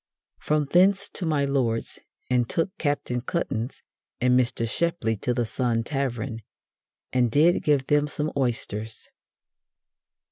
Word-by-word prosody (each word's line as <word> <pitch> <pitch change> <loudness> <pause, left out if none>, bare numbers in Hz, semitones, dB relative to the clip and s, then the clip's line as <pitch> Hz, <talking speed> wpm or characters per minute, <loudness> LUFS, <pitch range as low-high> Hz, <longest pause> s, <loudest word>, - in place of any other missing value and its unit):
From 150 -1 +1
thence 185 +6 +4
to 180 - -4
my 145 -3 +2
Lord's, 125 -5 -1 0.3
and 125 -2 +1
took 175 +4 -1
Captain 145 -5 -1
Cuttance 125 -5 -3 0.4
and 125 0 +3
Mr. 120 -2 +2
Shepley 165 -4 0
to 125 - -1
the 120 -1 0
Sun 115 0 0
Tavern, 125 -3 -3 0.7
and 125 -2 +3
did 155 +9 +4
give 145 -3 +2
them 145 +1 +2
some 150 +1 -3
oysters." 115 -4 -2
130 Hz, 130 wpm, -25 LUFS, 120-150 Hz, 0.7 s, thence